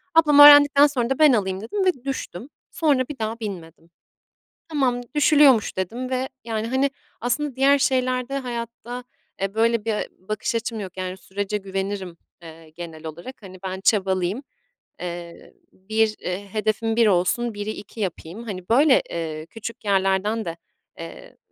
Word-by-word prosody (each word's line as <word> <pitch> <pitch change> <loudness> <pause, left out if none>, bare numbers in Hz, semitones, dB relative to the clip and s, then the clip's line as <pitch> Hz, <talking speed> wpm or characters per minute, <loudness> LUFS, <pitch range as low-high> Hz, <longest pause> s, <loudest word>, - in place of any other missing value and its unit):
Ablam 300 -3 +6
öğrendikten 290 0 +9
sonra 250 -5 -2
da 270 - -1
ben 305 -3 +7
alayım 190 -4 -1
dedim 380 - -2
ve 290 -10 0
düştüm. 265 -4 -5 0.2
Sonra 295 -5 +2
bir 295 - -7
daha 220 +1 -3
binmedim. 170 -6 -8 0.8
"Tamam, 265 -6 0
düşülüyormuş." 290 -6 +5
dedim 230 +8 -3
ve, 260 0 -1 0.2
yani, 225 -1 -3
hani, 265 +3 +1 0.3
aslında 265 +3 -2
diğer 275 +2 +4
şeylerde, 255 0 0
hayatta, 240 -1 -6 0.4
eee, 195 +1 -2
böyle 230 0 +2
bir 225 -1 0 0.3
bakış 215 +2 -2
açım 230 -1 -3
yok. 190 -3 -8
Yani, 185 0 -4
sürece 200 +2 -4
güvenirim, 195 -2 -4 0.3
eee, 165 -1 -13
genel 160 -1 -9
olarak. 170 - -9
Hani, 185 -2 -11
ben 190 0 -4
çabalayayım, 190 +2 +1 0.6
eee, 175 -1 -7 0.2
bir, 215 +3 0
eee, 190 +3 -5
hedefim 220 +1 -1
1 230 -1 +5
olsun, 210 +5 +1
1'i 205 +1 -4
2 215 +1 -9
yapayım. 185 +1 -5
Hani, 185 -5 -7
böyle, 270 +4 +5
eee, 160 -2 -4
küçük 230 +5 -8
yerlerden 195 +2 +1
de, 165 -2 -5 0.4
eee, - - -10
220 Hz, 150 wpm, -23 LUFS, 190-255 Hz, 0.8 s, öğrendikten